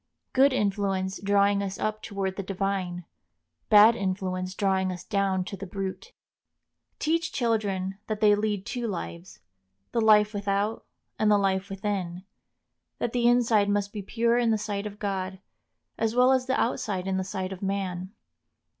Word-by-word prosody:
Good 270 +2 +5
influence 195 -4 -1
drawing 200 0 +3
us 195 -1 -4
up 215 0 -2
toward 195 -2 -3
the 195 - -3
divine, 190 -2 -3 0.6
bad 215 +2 +8
influence 185 -2 -2
drawing 190 -2 +1
us 180 0 -7
down 195 -3 0
to 200 - -6
the 195 0 -7
brute. 195 - -5 0.9
Teach 335 +3 0
children 200 -5 -1
that 215 -1 -2
they 210 -1 +5
lead 205 -2 -1
two 240 -2 -3
lives, 180 -2 -6 0.5
the 230 - +1
life 210 -1 +5
without 205 +1 -1 0.3
and 215 - +3
the 210 - +5
life 195 0 0
within; 195 -3 -3 0.7
that 235 - -2
the 240 -1 +2
inside 230 -4 +4
must 205 0 0
be 210 - -4
pure 235 +4 +1
in 235 -1 +2
the 220 - +3
sight 210 -1 -3
of 205 0 -9
God, 190 -2 -3 0.6
as 225 0 0
well 250 +1 +5
as 260 -1 +2
the 260 - +1
outside 210 -6 -1
in 190 -1 -1
the 190 - -1
sight 190 -1 -4
of 190 - -7
man. 190 -2 -3
200 Hz, 165 wpm, -27 LUFS, 190-215 Hz, 0.9 s, bad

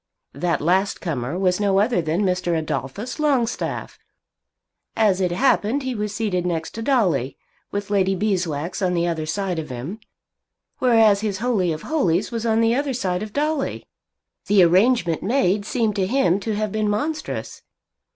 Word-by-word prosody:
That 165 +4 -1
last 185 +5 +1
comer 140 -2 -3
was 185 -1 +1
no 200 -2 +2
other 210 -1 +2
than 165 +5 0
Mr. 180 -3 0
Adolphus 160 - -4
Longstaff. 265 -6 -1 1.0
As 200 -4 +2
it 180 -2 +1
happened 255 +4 +2
he 260 -1 -2
was 210 -2 -3
seated 200 -4 -1
next 165 -2 -2
to 225 - -6
Dolly, 185 - +1 0.3
with 205 0 -4
Lady 195 -1 +2
Beeswax 180 -4 -2
on 180 -2 +1
the 170 0 +1
other 160 -2 -2
side 185 0 -2
of 155 -2 -6
him. 130 - -6 0.8
Whereas 225 -5 +4
his 210 -3 -2
Holy 210 -6 0
of 155 0 -5
Holies 210 - 0
was 230 0 -2
on 225 0 +3
the 230 0 +3
other 275 +1 0
side 185 -6 -1
of 215 0 -5
Dolly! 295 +2 -1 0.6
The 200 -2 +5
arrangement 180 -1 +3
made 205 -3 +1
seemed 225 -3 0
to 190 -2 +1
him 200 -6 +2
to 215 +1 -3
have 215 0 -2
been 215 0 0
monstrous. 300 +10 -3
200 Hz, 165 wpm, -22 LUFS, 175-225 Hz, 1.0 s, The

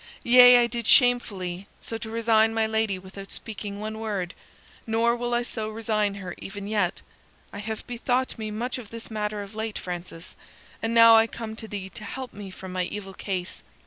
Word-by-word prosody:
Yea, 245 0 +9
I 240 - +5
did 235 -1 -3
shamefully, 200 -7 +3
so 225 - -5
to 225 0 -5
resign 225 -1 +3
my 225 -1 +2
lady 220 -3 0
without 190 +1 -10
speaking 205 -2 -6
one 215 +1 -5
word; 200 -5 -3 0.5
nor 230 +1 +2
will 240 0 -3
I 240 - +1
so 220 -2 -4
resign 215 -2 0
her 185 -3 -6
even 200 0 -7
yet. 205 -5 0 0.5
I 205 - -6
have 220 +1 -5
bethought 245 +1 -1
me 215 -1 -3
much 240 +4 -3
of 225 -5 -10
this 230 0 -8
matter 210 -1 -2
of 200 +1 -11
late, 220 0 -3
Francis, 175 -1 -7 0.5
and 225 +1 -1
now 230 0 +9
I 225 0 +6
come 225 -1 -6
to 220 0 -8
thee 200 -3 -5
to - - -9
help 260 +2 -6
me 200 -1 -8
from 185 0 -9
my 180 -1 -1
evil 195 0 -6
case. 185 -2 -4
220 Hz, 195 wpm, -26 LUFS, 200-230 Hz, 0.5 s, Yea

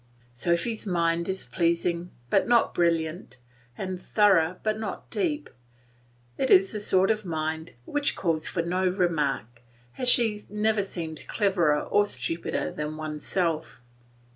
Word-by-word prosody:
Sophy's 170 - -1
mind 170 -1 +1
is 190 0 -3
pleasing 170 0 0 0.2
but 195 - +3
not 235 -1 +3
brilliant, 165 -3 0 0.4
and 185 -1 -4
thorough 185 -5 +3
but 215 0 0
not 220 - -5
deep; 310 -6 -1 0.9
it 265 - +1
is 190 +1 +6
the 215 - -3
sort 190 -1 +3
of 215 0 -1
mind 160 -2 -3
which 290 -1 0
calls 165 -4 -1
for 170 - -1
no 185 +2 0
remark, 150 - -1 0.4
as 250 - +3
she 220 -4 +4
never 210 0 +1
seems 160 -6 -5
cleverer 175 -8 +2
or 205 - +3
stupider 165 -4 -2
than 150 +1 -4
oneself. 155 +1 -2
180 Hz, 135 wpm, -27 LUFS, 160-205 Hz, 0.9 s, is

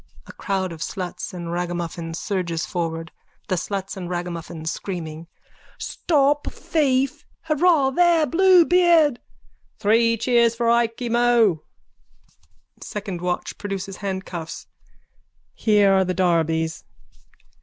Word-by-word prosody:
(A - - -12
crowd 190 -3 -2
of 160 -2 -9
sluts 185 -1 -5
and 170 -2 -6
ragamuffins 170 -1 -4
surges 170 -4 -2
forward.) 165 -2 -4 0.4
THE 185 - +2
SLUTS 195 +2 -4
AND 180 -3 -6
RAGAMUFFINS: 170 -2 -4
(Screaming.) 165 -4 -6 0.5
Stop 290 -2 +1
thief! 275 -1 0 0.2
Hurrah 305 -3 +3
there, 340 +1 +4
Bluebeard! 345 -3 +5 0.6
Three 230 +2 +3
cheers 235 0 +3
for 230 0 +1
Ikey 235 +1 0
Mo! 235 -7 +3 1.2
SECOND 200 -5 -5
WATCH: 180 0 -3
(Produces 195 -2 -5
handcuffs.) 190 -4 -5 0.9
Here 205 -3 +3
are 190 0 +4
the 185 0 -2
darbies. 165 -3 0
195 Hz, 105 wpm, -22 LUFS, 175-250 Hz, 1.2 s, Bluebeard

